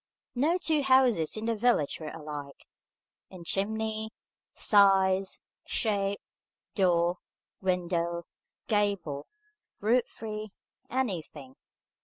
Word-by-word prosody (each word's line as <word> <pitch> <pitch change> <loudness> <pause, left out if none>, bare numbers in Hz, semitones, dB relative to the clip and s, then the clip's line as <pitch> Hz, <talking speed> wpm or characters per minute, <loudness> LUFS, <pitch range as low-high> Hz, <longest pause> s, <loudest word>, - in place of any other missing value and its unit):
No 300 +8 +2
two 320 -4 +1
houses 255 - +3
in 215 - -4
the 230 0 +1
village 215 -10 +2
were 155 -2 -5
alike, 150 -3 -8 0.6
in 185 -2 -10
chimney, 220 +4 -1 0.4
size, 195 -2 +4 0.3
shape, 200 -3 0 0.5
door, 175 -2 +2 0.4
window, 170 -2 0 0.4
gable, 200 -9 0 0.5
roof 235 +4 +2
tree, 215 -1 -6 0.4
anything. 165 - -3
195 Hz, 90 wpm, -29 LUFS, 170-220 Hz, 0.6 s, size